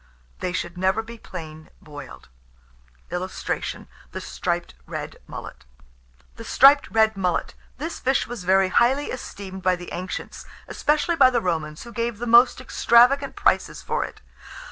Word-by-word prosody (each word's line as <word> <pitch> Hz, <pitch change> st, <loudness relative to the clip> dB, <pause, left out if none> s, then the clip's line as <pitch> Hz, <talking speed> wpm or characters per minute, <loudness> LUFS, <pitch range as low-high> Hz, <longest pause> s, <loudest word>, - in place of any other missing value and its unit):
They 180 Hz, -, -2 dB
should 180 Hz, 0 st, -4 dB
never 190 Hz, +4 st, +1 dB
be 230 Hz, +1 st, -11 dB
plain 160 Hz, -5 st, -9 dB
boiled. 145 Hz, -3 st, -11 dB, 0.8 s
[Illustration: 180 Hz, +1 st, -4 dB, 0.3 s
THE -, -, -4 dB
STRIPED -, -, -3 dB
RED -, -, -6 dB
MULLET.] -, -, -9 dB, 0.7 s
THE 230 Hz, -, -8 dB
STRIPED 275 Hz, +5 st, +6 dB
RED 220 Hz, -1 st, +3 dB
MULLET. 180 Hz, -3 st, -1 dB, 0.2 s
This 320 Hz, +4 st, -5 dB
fish 265 Hz, +1 st, +1 dB
was 240 Hz, -6 st, -7 dB
very 190 Hz, +1 st, +3 dB
highly 260 Hz, +8 st, +2 dB
esteemed 195 Hz, -6 st, -7 dB
by 185 Hz, 0 st, +2 dB
the 175 Hz, 0 st, -9 dB
ancients, 185 Hz, +1 st, -6 dB, 0.2 s
especially 305 Hz, +3 st, 0 dB
by 265 Hz, -3 st, +7 dB
the 245 Hz, -2 st, +1 dB
Romans, 160 Hz, -5 st, -3 dB
who 235 Hz, -, -11 dB
gave 235 Hz, -2 st, -2 dB
the 240 Hz, -, -4 dB
most 240 Hz, +2 st, +6 dB
extravagant 255 Hz, +2 st, +4 dB
prices -, -, +1 dB
for -, -, -1 dB
it. -, -, -9 dB
220 Hz, 145 wpm, -24 LUFS, 180-250 Hz, 0.8 s, by